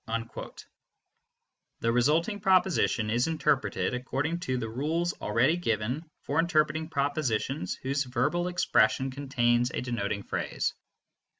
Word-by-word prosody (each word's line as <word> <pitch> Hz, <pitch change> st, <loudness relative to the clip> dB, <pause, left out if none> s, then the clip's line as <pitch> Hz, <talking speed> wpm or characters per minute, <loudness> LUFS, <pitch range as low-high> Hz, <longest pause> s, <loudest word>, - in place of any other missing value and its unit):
" 115 Hz, 0 st, -10 dB
The 115 Hz, -, +2 dB
resulting 155 Hz, -, +2 dB
proposition 185 Hz, -, +2 dB
is 120 Hz, +5 st, +2 dB
interpreted 150 Hz, -6 st, 0 dB
according 135 Hz, +6 st, -2 dB
to 130 Hz, -7 st, -2 dB
the 115 Hz, -2 st, -3 dB
rules 155 Hz, +9 st, -1 dB
already 120 Hz, +9 st, +2 dB
given 125 Hz, +1 st, -2 dB
for 145 Hz, +3 st, 0 dB
interpreting 160 Hz, -1 st, +1 dB
propositions 140 Hz, -2 st, -1 dB
whose 140 Hz, +1 st, 0 dB
verbal 145 Hz, +8 st, 0 dB
expression 135 Hz, -7 st, +2 dB
contains 125 Hz, -3 st, +1 dB
a -, -, -3 dB
denoting 100 Hz, -5 st, -2 dB
phrase. -, -, -2 dB
135 Hz, 115 wpm, -28 LUFS, 120-160 Hz, -, The